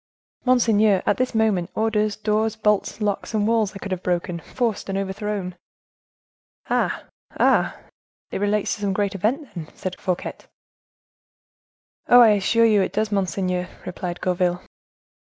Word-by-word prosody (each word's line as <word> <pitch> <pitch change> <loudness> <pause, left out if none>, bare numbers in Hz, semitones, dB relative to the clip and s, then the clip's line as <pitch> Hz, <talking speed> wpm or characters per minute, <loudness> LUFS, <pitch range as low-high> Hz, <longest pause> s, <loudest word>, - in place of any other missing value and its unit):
"Monseigneur, 220 -6 +3
at 205 - +2
this 255 -2 -1
moment, 210 -6 +1
orders, 215 -1 +1
doors, 215 0 0
bolts, 210 0 0
locks, 205 +1 -2
and 210 -1 +2
walls 225 -3 +1
I - - -4
could 195 0 -7
have 185 -1 -2
broken, 175 -1 -1
forced 230 +3 -3
and 195 - -1
overthrown!" 195 -1 -3 1.2
"Ah! - - 0 0.4
ah! - - +3 0.5
it - - -3
relates 205 0 +1
to 210 - -7
some 200 -1 0
great 200 0 0
event, 225 - -2
then?" 165 -4 -6
asked 185 -1 -6
Fouquet. 180 -2 -2 1.7
"Oh! 245 - +9
I 235 -2 +8
assure 215 +3 +3
you 215 -3 +4
it 190 - -1
does, 215 +1 0
monseigneur," 185 -2 -1 0.2
replied 180 -1 -5
Gourville. 180 0 0
205 Hz, 145 wpm, -23 LUFS, 185-220 Hz, 1.7 s, Oh